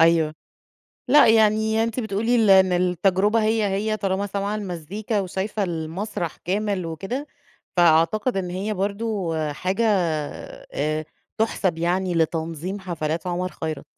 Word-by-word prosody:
أيوه. 165 -2 +4 0.7
لأ، 285 0 +7
يعني 220 0 +4
أنتِ 230 +2 -2
بتقولي 220 +2 0
ل - - +5
إن 190 -1 +6
التجربة 185 +4 +2
هي، 220 0 +2
هي 215 +3 -1
طالما 195 0 -1
سامعة 200 +1 -2
المزيكا 205 +2 -3
وشايفة 195 +3 -3
المسرح 170 +1 -4
كامل 195 -1 -2
وكده، 195 - -4 0.5
فأعتقد 175 +7 +3
إن 185 -2 -2
هي 195 +4 -2
برضه 200 -3 -2 0.2
حاجة 185 +10 -1 0.9
آآ 155 +2 -1 0.3
تُحسَب 195 -6 0
يعني 180 +2 0
لتنظيم 165 +3 -1
حفلات 165 -2 -3
عمر 180 +1 -1
خيرت. 155 -3 -3
190 Hz, 125 wpm, -23 LUFS, 170-215 Hz, 0.9 s, لأ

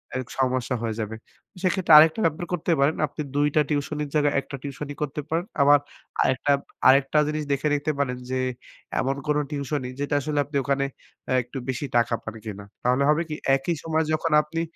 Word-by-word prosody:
এটি 130 -1 -4
সমস্যা 130 -1 0
হয়ে 110 -2 -2
যাবে। 110 0 -3 0.5
সেক্ষেত্রে 185 -3 +3
আরেকটা 160 +5 +6
ব্যাপার 165 +2 0
করতে 175 0 -1
পারেন 140 +3 +3
আপনি 145 +2 -7
২ 145 +1 +3
টা 155 - +6
টিউশনির 150 0 -2
জায়গায় 145 -1 +3
১ - - -7
টা 135 - -4
টিউশনি 145 +1 -6
করতে 150 0 -2
পারেন। 165 +3 0 0.2
আবার 145 +1 +7 0.4
আরেকটা, 130 +2 +1 0.4
আরেকটা 135 +3 +5
জিনিস 155 0 -2
দেখে 140 +2 +1
নিতে 145 +2 -1
পারেন 125 -3 0
যে, 130 - -1 0.6
এমন 135 +1 0
কোন 150 0 +2
টিউশনি 140 -2 -3
যেটা 145 0 -1
আসলে 150 +1 -1
আপনি 145 -1 -3
ওখানে 140 +1 +1 0.4
অ্যাঁ 130 -1 +2
একটু 125 +3 -9
বেশি 130 +2 -2
টাকা 120 0 +2
পান 110 - -7
কিনা। 100 -2 -7 0.2
তাহলে 125 +3 +2
হবে 150 +2 +3
কি 150 - -3 0.2
একই 135 +5 -1
সময় 160 0 +1
যখন 155 +1 0
আপনি 160 +2 -4
145 Hz, 190 wpm, -25 LUFS, 130-150 Hz, 0.6 s, আবার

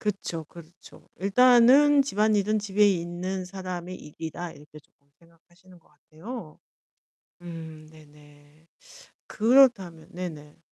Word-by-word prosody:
그쵸. 190 -6 -4
그렇죠. 170 +2 -17
일단은 250 +7 +5
'집안일은 215 -3 +1
집에 205 0 +2
있는 180 +1 -3
사람의 185 -1 -7
일이다.' 160 +3 -8
이렇게 150 +1 -15
쪼끔 140 0 -38
생각하시는 175 +2 -23
것 - - -30
같아요. 160 - -11 0.8
음 160 -3 -10
네네. 150 0 -20 0.6
그렇다면 215 -9 +2
네네. 160 -4 -8
175 Hz, 250 characters per minute, -25 LUFS, 160-210 Hz, 0.8 s, 일단은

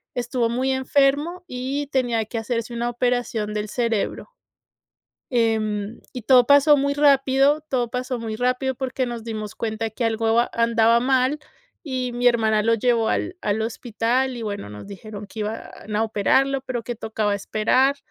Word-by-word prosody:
estuvo 245 -1 -1
muy 260 +3 0
enfermo 285 +6 +1
y 270 +3 -3
tenía 245 -5 0
que 225 +2 -4
hacerse 230 0 -3
una 235 +1 -1
operación 240 -3 -1
del 210 0 -3
cerebro, 230 - -2 1.0
em, 220 -3 0
y 250 - -6
todo 250 +1 +5
pasó 285 +1 +6
muy 280 0 0
rápido. 280 0 +4
Todo 245 -4 -1
pasó 250 +1 -3
muy 225 -2 -4
rápido 255 +2 0
porque 260 0 -2
nos 235 -2 -6
dimos 215 -2 -5
cuenta 220 0 -3
que 230 +3 -3
algo 225 0 +1
an 240 - 0
andaba 230 0 +3
mal 260 +3 +2 0.4
y 255 -5 -3
mi 245 +1 -1
hermana 220 -3 +2
lo 230 +1 +3
llevó 230 0 +1
al 360 - -1
al 210 +1 -1
hospital 240 +3 -1
y, 235 - -6
bueno, 205 - -5
nos 105 - -9
dijeron 205 +1 -9
que 215 +2 -8
iban 210 0 -5
a 215 - +2
operarlo, 265 +6 +2
pero 255 -3 -4
que 240 - -4
tocaba 215 -2 -2
esperar. 230 +7 +1
240 Hz, 165 wpm, -23 LUFS, 220-260 Hz, 1.0 s, pasó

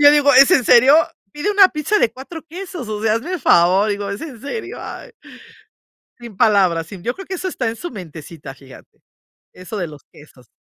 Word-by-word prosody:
Yo 290 0 +8
digo: 290 -1 +4
"¿Es 270 +5 +7
en 285 -9 +3
serio? 255 +5 +6 0.4
Pide 295 +8 -2
una 400 -2 +6
pizza 315 +8 -1
de 225 - +2
4 290 +6 -10
quesos, 350 - -8
o 210 -1 -5
sea, 220 -1 +2
hazme 260 +11 -4
el 355 - -5
favor, 185 +5 +3
digo, 200 0 -3
¿es 200 +1 -5
en 260 -9 -9
serio?" 435 +11 -6
Ay, - - -9 1.1
sin 235 -5 -12
palabras. 185 -7 +2
Sí, 190 +1 -11
yo 240 +5 -2
creo 385 - -10
que 380 - -5
eso 375 +1 -4
está 250 -9 -3
en 225 - -5
su 350 - -7
mentecita, 160 - -10
fíjate. 135 -1 -18 0.5
Eso 185 +4 -8
de 175 -4 -3
los 150 -2 -13
quesos. 130 -5 -19
230 Hz, 210 wpm, -19 LUFS, 185-300 Hz, 1.1 s, Yo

